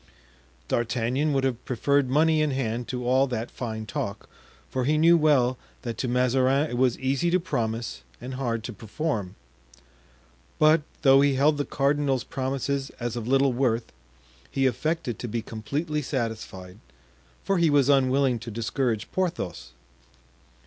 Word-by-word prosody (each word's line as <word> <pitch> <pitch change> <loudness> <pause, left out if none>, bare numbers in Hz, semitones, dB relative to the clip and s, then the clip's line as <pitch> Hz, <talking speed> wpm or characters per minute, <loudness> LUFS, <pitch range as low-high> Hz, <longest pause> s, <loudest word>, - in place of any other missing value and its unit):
D'Artagnan 125 +5 0
would 135 -2 +1
have 125 -3 -1
preferred 140 +2 +1
money 155 +3 +3
in 155 - +2
hand 120 -3 -2
to 125 -1 -4
all 130 +2 +4
that 120 -2 -4
fine 110 -3 -5
talk, 100 0 -4 0.4
for 130 -1 -2
he 150 +3 +2
knew 165 +2 +6
well 135 -6 +3 0.2
that 120 -2 -4
to 130 - -1
Mazarin 130 +3 +2
it - - -2
was 125 -2 +2
easy 135 +6 0
to 180 +2 +3
promise 115 - -3 0.2
and 125 +2 -7
hard 120 -4 -2
to 120 - -6
perform. 110 - -3 1.2
But, 155 +1 +5 0.2
though 135 -1 +7
he 140 -1 +3
held 145 +2 +3
the 145 - 0
cardinal's 140 -2 +1
promises 135 -1 -2
as 120 -1 -3
of 120 -2 -4
little 135 0 +3
worth, 120 -2 0 0.6
he 135 - 0
affected 130 -1 -1
to 120 - -4
be 115 0 -3
completely 150 +9 -3
satisfied, 110 -8 -5 0.6
for 195 -2 +1
he 170 -2 +4
was 145 -3 +4
unwilling 135 -2 +3
to 115 - -8
discourage 115 0 -1
Porthos. 170 - -3
130 Hz, 150 wpm, -26 LUFS, 115-145 Hz, 1.2 s, though